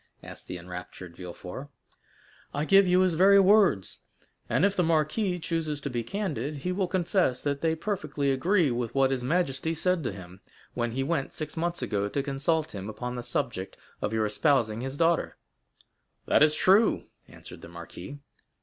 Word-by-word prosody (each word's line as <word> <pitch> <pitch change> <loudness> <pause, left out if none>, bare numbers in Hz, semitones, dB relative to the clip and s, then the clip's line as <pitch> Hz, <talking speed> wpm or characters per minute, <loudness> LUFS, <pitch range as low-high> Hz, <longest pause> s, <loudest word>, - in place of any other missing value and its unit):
asked - - -9
the 90 - -5
enraptured 90 0 -9
Villefort. 90 +9 -8 0.9
"I 145 +2 0
give 195 +2 +6
you 180 +1 +4
his 185 -2 +3
very 195 +4 +6
words; 195 - +3 0.5
and - - +3
if 200 0 +1
the 180 - +2
marquis 165 +4 +1
chooses 160 -3 -2
to 140 - -4
be 120 -1 -1
candid, 150 - -3
he 180 - +1
will 185 0 0
confess 175 -7 0
that 140 -1 -1
they 160 -1 +1
perfectly 150 -7 -2
agree 165 +2 +2
with 120 0 -3
what 135 -1 +3
his 130 -2 -1
majesty 160 +1 0
said 180 +1 0
to 120 - -2
him, 95 -1 -11 0.3
when 120 -1 -2
he 135 +2 -1
went 140 -1 -2
six 155 -1 -4
months 170 +1 -2
ago 100 -1 -1
to 140 +6 -2
consult 150 +3 -1
him 100 0 -6
upon 125 +3 -5
the 120 - -4
subject - - -3 0.2
of 105 - -1
your 110 -1 +1
espousing 115 -1 +1
his 135 +2 -5
daughter." 165 +1 +1 0.9
0091m - - -11
"That - - +5
is 155 0 +5
true," 200 +7 +4 0.2
answered - - -11
the - - -11
marquis. 85 +8 -9
145 Hz, 180 wpm, -27 LUFS, 120-175 Hz, 0.9 s, give